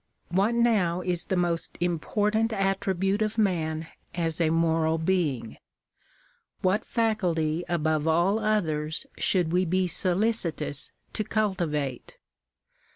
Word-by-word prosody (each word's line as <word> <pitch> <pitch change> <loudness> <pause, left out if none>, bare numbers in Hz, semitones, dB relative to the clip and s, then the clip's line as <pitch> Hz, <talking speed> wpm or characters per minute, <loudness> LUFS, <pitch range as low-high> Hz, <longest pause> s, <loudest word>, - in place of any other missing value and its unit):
What 195 +7 +2
now 205 -7 +2
is 175 -1 -1
the 190 - -1
most 175 -2 -1
important 210 +6 0
attribute 195 0 0
of 215 +1 -1
man 165 -6 0 0.3
as 165 -1 +1
a 160 - +3
moral 160 0 +2
being? 160 -9 -1 1.1
What 190 +3 +2
faculty 175 -8 0
above 155 -2 0
all 175 +6 +3
others 160 - 0
should 175 -4 +2
we 180 +1 +3
be 185 +1 +1
solicitous 180 -6 0 0.2
to 215 - -1
cultivate 170 - -2
175 Hz, 110 wpm, -27 LUFS, 160-205 Hz, 1.1 s, a